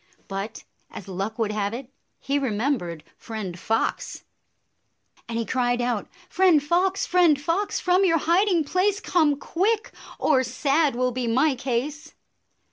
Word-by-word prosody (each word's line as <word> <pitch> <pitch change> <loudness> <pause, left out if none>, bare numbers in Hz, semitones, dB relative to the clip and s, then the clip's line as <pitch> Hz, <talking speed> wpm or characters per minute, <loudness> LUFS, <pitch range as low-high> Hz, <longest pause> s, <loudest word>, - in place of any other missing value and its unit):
But, 195 +3 -5 0.3
as 195 - -9
good 190 - -8
luck 195 +4 -3
would 220 -3 0
95 210 0 -2
have 200 +2 -1
it, 260 +1 -9 0.3
he 280 +1 -1
remembered 215 - -2
Friend 200 -6 -6
Fox, 225 +5 -2 1.1
and 230 - -3
he 230 - -1
cried 245 0 0
out, 240 -4 -1
" 355 - -25
Friend 360 -5 +4
Fox, 370 +5 +1
Friend 345 -5 +4
Fox, 335 +8 -1
from 365 +1 +3
your 335 -3 +4
hiding 345 +2 +2
place 375 +7 +1
Come 315 -8 +2
quick, 415 +9 -1 0.3
or 265 -4 +3
sad 275 +3 +1
will 250 +1 +1
be 250 -1 -3
my 265 +6 +3
case! 275 +5 -3
275 Hz, 155 wpm, -24 LUFS, 230-345 Hz, 1.1 s, Friend